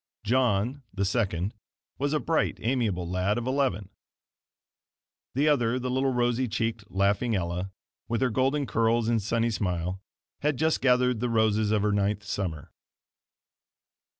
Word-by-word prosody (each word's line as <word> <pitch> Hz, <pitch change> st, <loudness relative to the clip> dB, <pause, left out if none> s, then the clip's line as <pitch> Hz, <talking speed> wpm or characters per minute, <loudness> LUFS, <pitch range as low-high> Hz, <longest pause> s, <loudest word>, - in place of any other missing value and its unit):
John, 125 Hz, +2 st, +1 dB
the 100 Hz, 0 st, -1 dB
second, 100 Hz, -3 st, 0 dB, 0.5 s
was 140 Hz, +1 st, 0 dB
a 155 Hz, -, +1 dB
bright, 165 Hz, +1 st, 0 dB
amiable 110 Hz, -8 st, 0 dB
lad 90 Hz, +4 st, 0 dB
of 120 Hz, -, -3 dB
eleven. 130 Hz, -8 st, 0 dB, 1.5 s
The 145 Hz, +3 st, +2 dB
other 125 Hz, -5 st, +2 dB
the 125 Hz, 0 st, -2 dB
little 135 Hz, +1 st, +1 dB
rosy 120 Hz, 0 st, +1 dB
cheeked, 115 Hz, -1 st, -2 dB
laughing 100 Hz, +4 st, +1 dB
Ella, 90 Hz, +1 st, -2 dB, 0.4 s
with 115 Hz, +2 st, -1 dB
her 130 Hz, -2 st, +2 dB
golden 135 Hz, +4 st, +1 dB
curls 115 Hz, 0 st, +1 dB
and 115 Hz, -2 st, +2 dB
sunny 115 Hz, +3 st, 0 dB
smile 90 Hz, -2 st, -2 dB, 0.4 s
had 145 Hz, -2 st, 0 dB
just 160 Hz, +2 st, +1 dB
gathered 125 Hz, -2 st, +3 dB
the 125 Hz, +1 st, -1 dB
roses 110 Hz, -2 st, +2 dB
of 105 Hz, -1 st, +2 dB
her 105 Hz, -, +2 dB
ninth 100 Hz, +1 st, 0 dB
summer. 90 Hz, -7 st, -4 dB
115 Hz, 145 wpm, -27 LUFS, 100-125 Hz, 1.5 s, gathered